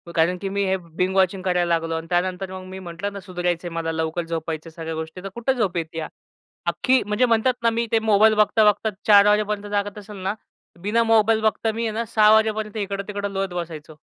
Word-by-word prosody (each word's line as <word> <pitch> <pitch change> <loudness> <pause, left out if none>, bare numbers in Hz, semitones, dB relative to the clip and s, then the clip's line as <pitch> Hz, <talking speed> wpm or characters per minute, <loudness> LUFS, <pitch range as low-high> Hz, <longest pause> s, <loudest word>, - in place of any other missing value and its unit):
कारण 170 +3 +2
की 195 +1 -4
मी 200 +1 -1
हे 190 0 +1
बिंग 180 +2 -3
वॉचिंग 190 0 +2
करायला 180 -2 +1
लागलो 165 0 -4
आणि 160 0 -5
त्यानंतर 185 +1 -1
मग 185 0 -7
मी 190 0 -7
म्हटलं 180 +3 -5
ना 200 - -6
सुधारायचंय 175 -2 -3
मला. 165 -1 -3
लवकर 160 +1 -2
झोपायचंय 165 -1 -4
सगळ्या 160 0 -6
गोष्टी, 160 +3 -6
तर 195 - -5
कुठे 240 +3 0
झोप 200 -8 -1
येते. 165 0 -4 0.7
अख्खी 260 0 +2
म्हणजे 210 +4 +2
म्हणतात 235 +2 +2
ना 230 - +5
मी 230 +1 -1
ते 225 - +4
मोबाईल 220 0 +4
बघता-बघता 210 0 +3 0.2
04:00 205 -1 +8
वाजेपर्यंत 210 0 +1
जागत 205 +1 -1
असेल 205 0 -10
ना, 190 +2 -2 0.5
बिना 225 +4 +2
मोबाईल 225 -1 +3
बघता 220 +1 +1
मी 230 +2 -3
आहे - - -2
ना 230 +1 -2
06:00 215 0 +6
वाजेपर्यंत 215 0 +1
इकडं-तिकडं 200 0 -3
लोळत 195 -1 -2
बसायचो. 160 -3 -6
195 Hz, 205 wpm, -23 LUFS, 175-215 Hz, 0.7 s, 04:00